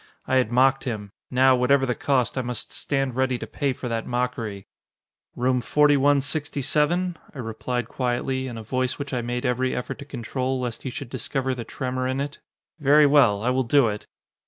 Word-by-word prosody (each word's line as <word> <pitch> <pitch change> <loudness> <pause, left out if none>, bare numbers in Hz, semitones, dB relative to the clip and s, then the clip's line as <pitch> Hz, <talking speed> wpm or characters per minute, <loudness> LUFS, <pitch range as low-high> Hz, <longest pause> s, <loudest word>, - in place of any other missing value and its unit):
I 130 - +3
had 125 -3 +2
mocked 135 +2 +3
him. 105 -5 -4 0.2
Now, 130 +1 +5
whatever 135 +2 +3
the 125 - 0
cost, 130 -1 0
I 130 - 0
must 120 -1 -4
stand 135 -3 -1
ready 130 -1 +1
to - - -6
pay 140 -2 -1
for 125 0 -5
that 115 -1 -2
mockery. 120 -5 -2 0.7
"Room 125 0 +1
4167?" 145 +4 +2 0.2
I - - -9
replied 120 0 -3
quietly, 130 +1 -1
in 120 -3 -6
a 110 - -7
voice 130 +3 -1
which 140 -1 -5
I 125 - 0
made 120 +2 -3
every 130 +1 0
effort 125 - -4
to 140 - -8
control, 130 0 -3
lest 120 -3 -4
he 130 - -4
should 130 0 -7
discover 130 +1 -2
the 120 -2 -6
tremor 130 +2 -3
in 130 +1 -1
it. 140 +1 -4 0.4
"Very 150 +1 +6
well, 130 -8 +4
I 125 - +2
will 130 +1 +2
do 130 0 +4
it!" 105 0 -6
130 Hz, 190 wpm, -24 LUFS, 120-140 Hz, 0.7 s, Very